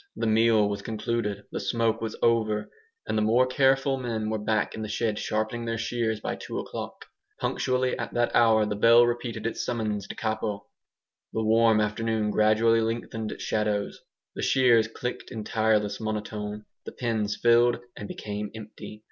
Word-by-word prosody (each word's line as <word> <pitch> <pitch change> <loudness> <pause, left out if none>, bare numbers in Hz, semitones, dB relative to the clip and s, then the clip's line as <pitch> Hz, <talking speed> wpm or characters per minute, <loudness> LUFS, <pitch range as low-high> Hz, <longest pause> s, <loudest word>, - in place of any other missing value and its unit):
The - - -2
meal 110 -1 +4
was 100 0 -3
concluded; 110 -2 -3
the - - -3
smoke 115 +3 0
was 110 -1 -3
over; 110 -2 +1 0.3
and - - -2
the 110 - +2
more 115 +4 +4
careful 135 +1 +2
men 115 -4 -3
were 110 - -1
back 110 +1 0
in 110 - -6
the 110 - -3
shed 105 0 -1
sharpening 110 +2 -2
their 115 0 -2
shears 115 -1 -1
by - - -4
two - - -6
o'clock. - - -6 0.3
Punctually 130 0 0
at - - -4
that 120 0 +1
hour 110 -2 +5
the 105 0 -2
bell 115 +3 +6
repeated 120 -2 -3
its 115 - -2
summons 105 -4 -2
DE - - -7
CAPO. 110 -2 -3 0.7
The 110 - -1
warm 110 0 +4
afternoon 105 0 0
gradually 110 +2 +3
lengthened 115 -1 -3
its - - -7
shadows; 105 -1 -1 0.3
the - - -5
shears 120 -4 +4
clicked 125 +2 -5
in 110 -4 -6
tireless 110 -1 +1
monotone; 105 -1 -4 0.2
the - - -8
pens 110 -4 -1
filled 120 0 +4 0.2
and 105 - -7
became 105 0 -5
empty. 110 0 -10
110 Hz, 170 wpm, -27 LUFS, 105-115 Hz, 0.7 s, bell